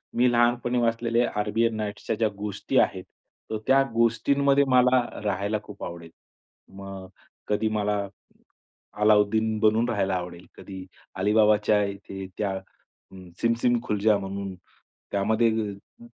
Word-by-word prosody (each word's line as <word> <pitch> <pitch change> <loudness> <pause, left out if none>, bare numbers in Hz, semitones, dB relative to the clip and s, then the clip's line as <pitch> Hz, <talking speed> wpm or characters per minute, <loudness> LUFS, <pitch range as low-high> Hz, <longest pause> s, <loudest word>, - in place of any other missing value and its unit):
मी 125 +1 +4
लहानपणी 120 +1 +2
वाचलेले 115 +1 +1
अरेबियन 110 +1 0
नाईट्सच्या 105 +1 -3
ज्या 110 0 +1
गोष्टी 100 -1 -3
आहेत, - - +1 0.5
तर 110 - -2
त्या 135 +1 +5
गोष्टींमध्ये 140 +5 +3
मला 125 0 +5 0.2
राहायला 100 +1 -1
खूप 105 -1 -11
आवडेल. 85 -1 -7 0.7
मग 95 -1 -8 0.4
कधी 105 +1 0
मला 105 -1 -1 0.9
अलाउद्दीन 110 +1 +3
बनून 110 +2 +3
राहायला 95 -4 0
आवडेल. 90 -1 -6
कधी 95 -2 -9 0.3
अलीबाबाच्या 105 +1 +3
इथे 100 -1 -7
त्या 100 -2 -1 0.6
अ, - - -13 0.3
सिम 115 0 +3
सिम 120 -1 +3
खुल 105 -3 -2
जा 105 0 +4
म्हणून 100 0 -5 0.6
त्यामध्ये 110 +3 +2 0.5
अ, - - -12
105 Hz, 125 wpm, -25 LUFS, 100-115 Hz, 0.9 s, त्या